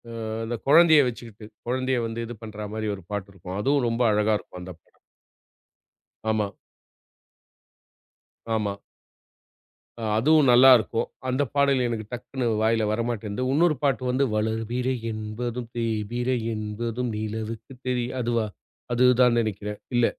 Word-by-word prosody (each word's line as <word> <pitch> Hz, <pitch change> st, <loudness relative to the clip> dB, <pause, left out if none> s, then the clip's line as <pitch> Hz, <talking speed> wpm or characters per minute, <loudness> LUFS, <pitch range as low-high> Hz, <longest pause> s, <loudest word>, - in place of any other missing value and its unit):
அ -, -, -8 dB, 0.3 s
அந்தக் 115 Hz, 0 st, -4 dB
கொழந்தைய 160 Hz, +1 st, +7 dB
வச்சுக்கிட்டு. 115 Hz, -3 st, -8 dB, 0.2 s
குழந்தைய 130 Hz, +1 st, 0 dB
வந்து 115 Hz, +1 st, -4 dB
இது 120 Hz, -, -7 dB
பண்றா 105 Hz, -1 st, -6 dB
மாதிரி 110 Hz, 0 st, -3 dB
ஒரு 95 Hz, -, -13 dB
பாட்டு 100 Hz, -1 st, -3 dB
இருக்கும். 95 Hz, 0 st, -7 dB
அதுவும் 135 Hz, +3 st, +2 dB
ரொம்ப 115 Hz, +1 st, -1 dB
அழகா 105 Hz, +1 st, +2 dB
இருக்கும் 90 Hz, -, -12 dB
அந்தப் 90 Hz, -2 st, -10 dB, 1.5 s
ஆமா. 105 Hz, -2 st, 0 dB, 2.0 s
ஆமா. 100 Hz, -2 st, -1 dB, 1.2 s
அ -, -, -7 dB, 0.2 s
அதுவும் 150 Hz, +3 st, +4 dB
நல்லா 125 Hz, +2 st, +8 dB
இருக்கும். 115 Hz, 0 st, -2 dB, 0.2 s
அந்தப் 130 Hz, 0 st, 0 dB
பாடல் 140 Hz, -2 st, +3 dB
எனக்கு 115 Hz, -2 st, -3 dB
டக்குன்னு 125 Hz, +1 st, -4 dB, 0.2 s
வாயில 110 Hz, 0 st, +2 dB
வர 110 Hz, +2 st, 0 dB
மாட்டேன்து. 110 Hz, 0 st, -4 dB
உன்னொரு 155 Hz, +3 st, +3 dB
பாட்டு 135 Hz, -2 st, +1 dB
வந்து 130 Hz, +2 st, +2 dB
வளர்பிறை 115 Hz, +4 st, -1 dB, 0.2 s
என்பதும் 115 Hz, +2 st, -5 dB
தேய்பிறை 120 Hz, +2 st, -1 dB, 0.2 s
என்பதும் 115 Hz, +3 st, -3 dB
நிலவுக்கு 110 Hz, +2 st, -5 dB, 0.2 s
தெரிய, 125 Hz, -1 st, 0 dB
அதுவா? 115 Hz, -2 st, 0 dB, 0.5 s
அதுதான் 125 Hz, -1 st, +5 dB
நினைக்கிறேன். 105 Hz, -1 st, -4 dB, 0.2 s
இல்ல 120 Hz, -1 st, +4 dB
115 Hz, 130 wpm, -25 LUFS, 110-125 Hz, 2.0 s, நல்லா